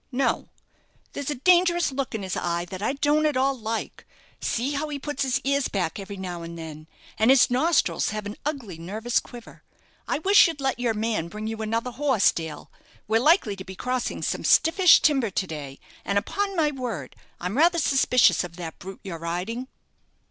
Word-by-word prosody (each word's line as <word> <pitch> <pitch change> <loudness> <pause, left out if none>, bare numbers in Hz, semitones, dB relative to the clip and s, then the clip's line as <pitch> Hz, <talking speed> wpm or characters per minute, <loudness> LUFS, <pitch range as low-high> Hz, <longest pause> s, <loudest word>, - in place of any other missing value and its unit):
"No, 265 +2 0 0.6
there's 285 -1 -4
a 295 - -1
dangerous 345 +3 +3
look 265 -3 -3
in 210 - -4
his 185 -1 -3
eye 170 0 -1
that 185 0 -6
I 220 - 0
don't 295 +2 +2
at 295 -4 0
all 270 +1 +2
like. 225 -2 -5 0.3
See 245 +5 -1
how 295 +1 -2
he 290 - -3
puts 290 0 -5
his 265 -2 +1
ears 280 0 +1
back 185 -2 -2
every 200 0 -7
now 180 -2 -5
and 170 0 -8
then; 155 -1 -9 0.3
and 220 +2 +4
his 265 -2 +6
nostrils 310 +6 +2
have 215 -1 -4
an 205 +1 -5
ugly 250 - -4
nervous 215 +8 -1
quiver. 240 -2 -12 0.5
I - - 0
wish 390 +6 +6
you'd 325 -3 -5
let 265 -3 -1
your 235 -2 0
man 215 -6 -1
bring 210 +5 -7
you 220 0 -4
another 230 +3 -2
horse, 260 -4 +3
Dale. 160 -2 -7 0.4
We're 225 +2 +2
likely 300 - +3
to 190 - -7
be 190 0 -9
crossing 250 +4 -3
some - - -2
stiffish 350 +2 +6
timber 270 -7 +2
to 190 0 -1
day; 145 -5 -7 0.3
and, 200 - 0
upon 395 - -1
my 305 -2 +2
word, 235 - -5 0.2
I'm 180 +4 -3
rather 340 +5 +4
suspicious 270 -8 +4
of 170 -1 -8
that 165 -2 -7
brute 190 +1 -9
you're 170 -4 -6
riding." 180 +10 -4
235 Hz, 195 wpm, -25 LUFS, 190-280 Hz, 0.6 s, his